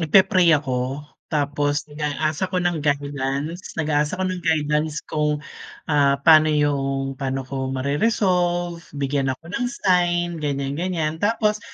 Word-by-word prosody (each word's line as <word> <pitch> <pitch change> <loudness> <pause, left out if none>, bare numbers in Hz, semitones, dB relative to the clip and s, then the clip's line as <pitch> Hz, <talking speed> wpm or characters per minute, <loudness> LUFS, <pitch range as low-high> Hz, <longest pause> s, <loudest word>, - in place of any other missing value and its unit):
nagpe-pray 185 +1 +5
ako 130 -2 -1 0.3
tapos 145 -1 0
nag-a-ask 150 0 -2
ako 185 - -3
ng 175 -3 0
guidance, 145 +3 -2
nag-a-ask 150 +1 0
ako 185 - -1
ng 180 - -5
guidance 150 -1 0
kung, 150 -1 0 0.5
ah 140 -2 +3
pano 155 -1 +7
yung 135 -2 0
paano 135 0 -1
ko 130 0 -4
mare-resolve, 175 - 0 0.2
bigyan 140 -1 0
ako 160 - -38
ng 245 +1 -1
sign 175 -6 +1
ganiyan-ganiyan. 155 +3 -2
Tapos 210 0 +1
150 Hz, 125 wpm, -22 LUFS, 140-175 Hz, 0.5 s, pano